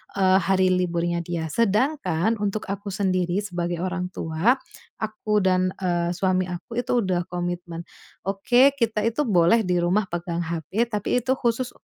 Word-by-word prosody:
eee, 190 -1 +4
hari 190 0 +2
liburnya 175 -1 0
dia. 165 -1 -3
Sedangkan 225 - +1
untuk 205 +1 -2
aku 200 +1 -4
sendiri 185 -1 0
sebagai 175 -3 -3
orang 185 -1 -2
tua 160 +10 +1 0.4
aku 215 -1 -1
dan, 185 0 +2
eee, 175 -2 0
suami 185 0 +1
aku 180 +7 -5
itu 245 0 +1
udah 180 -2 0
komitmen. 175 -1 -4 0.4
"Oke, 240 +8 +4
kita 225 -4 0
itu 230 +6 0
boleh 190 +3 +4
di 180 -1 +1
rumah 190 +4 +2
pegang 175 -1 -3
HP, 170 +7 -1
tapi 210 +1 -1
itu 260 +1 +2
khusus, 240 0 -1
185 Hz, 150 wpm, -24 LUFS, 175-215 Hz, 0.4 s, eee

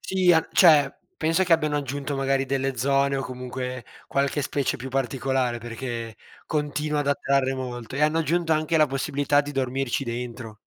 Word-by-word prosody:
Sì, 185 -2 +3
a 160 -1 +3
cioè, 150 -6 +6 0.3
pensa 165 +4 +2
che 175 - +2
abbiano 155 -2 +2
aggiunto 140 0 -3
magari 135 0 +1
delle 135 -1 -1
zone 140 +1 +2
o 135 - -2
comunque, 125 0 -5 0.2
qualche 140 +1 0
specie 140 0 -1
più 130 +3 -6
particolare, 130 -1 -1
perché 115 -1 -6 0.3
continua 150 0 -1
ad 145 - -2
attrarre 140 -2 +1
molto, 125 -2 -6
e 145 - -2
hanno 155 +2 +3
aggiunto 165 0 +1
anche 155 +1 +1
la 155 - +5
possibilità 140 +1 +1
di 145 0 -7
dormirci 135 0 -1
dentro. 120 -2 -6
135 Hz, 170 wpm, -25 LUFS, 130-150 Hz, 0.3 s, cioè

